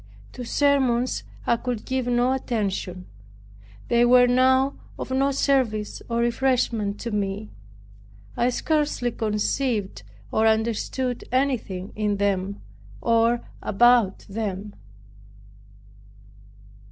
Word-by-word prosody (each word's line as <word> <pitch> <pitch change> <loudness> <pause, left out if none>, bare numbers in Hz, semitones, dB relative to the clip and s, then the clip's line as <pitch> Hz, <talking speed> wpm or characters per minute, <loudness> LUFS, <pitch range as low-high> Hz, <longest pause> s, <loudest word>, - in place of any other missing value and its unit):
To 250 - -7
sermons 255 -2 +1 0.2
I 235 - +2
could 240 -2 -4
give 260 -1 -2
no 245 +1 +2
attention; 200 -7 -3 0.8
they 235 0 +3
were 245 +1 +6
now 260 +2 +3 0.2
of - - -6
no 270 +1 +2
service 260 -6 0
or 230 - -1
refreshment 235 -4 0
to 235 - -4
me. 205 0 -3 0.8
I 240 - +2
scarcely 295 -2 0
conceived 215 - -1 0.3
or 220 0 +3
understood 230 +3 -1
anything 245 -8 -1
in 210 -1 0
them, 200 -1 -1 0.4
or 230 - +2
about 235 -2 +3
them. 205 -1 -4
235 Hz, 100 wpm, -24 LUFS, 210-255 Hz, 0.8 s, were